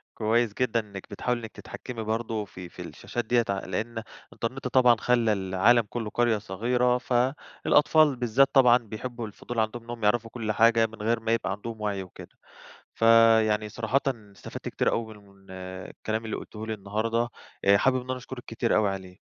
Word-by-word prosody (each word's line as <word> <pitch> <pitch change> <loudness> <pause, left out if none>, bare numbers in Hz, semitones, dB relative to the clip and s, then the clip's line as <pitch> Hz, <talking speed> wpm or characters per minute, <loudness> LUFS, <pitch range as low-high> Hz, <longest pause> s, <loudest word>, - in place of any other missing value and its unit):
كويس 115 0 +1
جدًا، 120 -2 +1
إنك 100 -3 -9
بتحاولي 125 -1 -2
إنك 110 -1 -7
تتحكمي 120 -3 -8
برضه 110 0 -2
في 90 -2 -10
في - - -10
الشاشات 120 -1 -5
ديّة 120 0 +2
ع 100 0 0
لأن 110 +5 -4 0.3
الإنترنت 125 +2 -4
طبعًا، 125 -2 +5
خلّى 120 -3 +2
العالم 95 +5 +3
كُلّه 115 -3 -4
قرية 120 -3 +2
صغيرة، 125 +5 +1
فالأطفال 135 +3 +2
بالذات 125 +3 +3
طبعًا، 125 -2 +7
بيحبّوا 120 +1 -6
الفضول، 115 +3 -8
عندهم 110 +2 -2
إنهُم 120 -2 -6
يعرفوا 115 +1 +2
كُلّ 110 -3 -3
حاجة 115 +1 +4
من 110 - -14
غير 115 +1 +1
ما 115 0 -1
يبقى 95 -4 -1
عندهم 110 +2 -6
وعي 100 -2 -2
وكده، 90 - -13 0.6
فيعني 115 -2 +5
صراحةً 115 +6 0
استفدت 105 -6 -7
كتير - - 0
أوي 110 -1 -3
م 100 -1 -20
من 95 -1 -20
الكلام 95 +4 -5
اللي 110 - -3
قُلتِيه 110 0 -8
لي 110 - -2
النهارده 110 +4 -1 0.4
آآ 100 0 +6
حابِب 130 +2 +3
إن 130 - -8
أنا 130 - -1
أشكُرِك 125 -1 -9
كتير 115 - 0
أوي 105 -2 +3
عليه. 95 -1 -7
115 Hz, 175 wpm, -27 LUFS, 105-120 Hz, 0.6 s, طبعًا